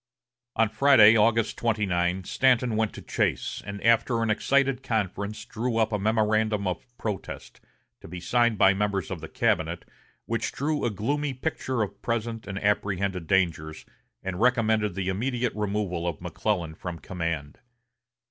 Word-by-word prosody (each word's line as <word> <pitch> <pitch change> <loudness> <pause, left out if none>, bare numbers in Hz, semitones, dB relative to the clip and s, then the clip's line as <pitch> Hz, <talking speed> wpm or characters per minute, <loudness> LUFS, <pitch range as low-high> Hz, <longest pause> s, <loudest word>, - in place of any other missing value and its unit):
On 115 - +3
Friday, 110 -1 +6
August 115 +1 +2
29, 95 -5 0
Stanton 125 +2 +2
went 110 -1 +1
to - - -9
Chase, - - -1
and 100 0 -5
after 115 0 +3
an 110 - +1
excited 135 +3 +1
conference 105 -3 -3
drew 115 +1 -2
up 110 -1 +2
a 105 - 0
memorandum 110 0 +1
of 90 +5 -3
protest, 105 -4 -6 0.4
to - - -12
be 90 +2 -7
signed 120 +4 +2
by 95 - +6
the 100 - -3
members 100 -2 -1
of 90 -4 -5
the 80 - -6
cabinet, - - 0 0.4
which 115 -1 -2
drew 150 0 -1
a - - +2
gloomy 135 +7 -2
picture 130 -4 -2
of 100 -1 -7
present 115 -1 -3
and 100 -1 -5
apprehended 100 -3 0
dangers, 80 -5 0 0.4
and 95 +1 -4
recommended 110 -5 +2
the 95 -1 -2
immediate 120 +5 -1
removal 100 -5 -2
of 85 -4 -3
McClellan 90 -7 -2
from 85 +1 -6
command. 85 -5 -4
105 Hz, 155 wpm, -26 LUFS, 95-115 Hz, 0.4 s, Friday